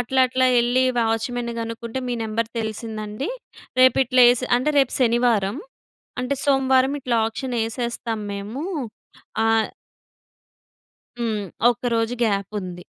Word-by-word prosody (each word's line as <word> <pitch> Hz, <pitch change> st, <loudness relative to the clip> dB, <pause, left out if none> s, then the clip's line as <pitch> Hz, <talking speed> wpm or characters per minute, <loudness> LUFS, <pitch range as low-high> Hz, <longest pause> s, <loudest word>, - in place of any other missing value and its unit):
అట్లా, 260 Hz, +2 st, +1 dB
అట్లా 255 Hz, 0 st, +2 dB
ఎళ్ళి 245 Hz, +2 st, +2 dB
వాచ్‌మెన్‌ని 235 Hz, +1 st, -1 dB
గనుక్కుంటే, 230 Hz, +2 st, -5 dB
మీ 245 Hz, -, -1 dB
నంబర్ 225 Hz, +1 st, -2 dB
తెలిసిందండి. 220 Hz, -, -4 dB, 0.5 s
రేపు 255 Hz, 0 st, +6 dB
ఇట్లా 250 Hz, 0 st, +5 dB
ఎసి 255 Hz, +1 st, -3 dB
అంటే 300 Hz, +5 st, 0 dB
రేపు 270 Hz, -2 st, +2 dB
శనివారం, 235 Hz, -3 st, +2 dB, 0.6 s
అంటే 270 Hz, +3 st, -1 dB
సోమవారం 265 Hz, -1 st, +3 dB
ఇట్లా 245 Hz, -3 st, 0 dB
ఆక్షన్ 245 Hz, +2 st, -4 dB
ఎసేస్తాం 230 Hz, -1 st, -3 dB
మేము. 210 Hz, +9 st, -5 dB, 0.8 s
ఆ -, -, +3 dB, 1.7 s
హ్మ్. 220 Hz, -3 st, -1 dB, 0.3 s
ఒక్క 245 Hz, +1 st, -5 dB
రోజు 225 Hz, +1 st, 0 dB
గ్యాప్ 200 Hz, -3 st, 0 dB
ఉంది. 180 Hz, -2 st, -8 dB
235 Hz, 120 wpm, -22 LUFS, 220-255 Hz, 1.7 s, రేపు